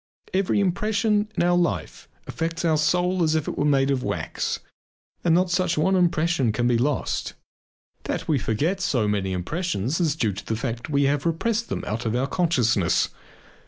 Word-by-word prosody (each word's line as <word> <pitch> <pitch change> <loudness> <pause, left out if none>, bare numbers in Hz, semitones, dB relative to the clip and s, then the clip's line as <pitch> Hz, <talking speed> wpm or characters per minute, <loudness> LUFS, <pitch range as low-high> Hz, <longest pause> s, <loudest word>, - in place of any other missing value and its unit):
Every 190 +1 +1
impression 210 +2 +1
in - - +3
our 175 0 +3
life 175 -1 -1 0.2
affects 165 +1 -3
our 160 -2 +3
soul 180 +4 +1
as 160 -1 +2
if 155 - -1
it - - -3
were 145 - 0
made 140 -1 +3
of 135 -2 0
wax - - -2 0.7
and 165 -2 +4
not 180 - +5
one 185 -1 +1
such 165 - 0
impression 170 - +2
can 120 +3 0
be 120 - +3
lost. 140 +3 -1 0.7
That - - -3
we 150 -4 +2
forget 155 - -1
so 130 - +1
many 100 -2 -1
impressions 140 - -2
is 160 -4 +1
due 110 -9 0
to 100 - -7
the 110 - -2
fact 115 +1 -4
that - - -11
we 140 0 +3
have 140 +2 +1
repressed 225 +8 -1
them - - -3
out 115 +2 -3
of 110 - -1
our 125 +2 +1
consciousness. 125 - +1
155 Hz, 190 wpm, -24 LUFS, 120-180 Hz, 0.7 s, not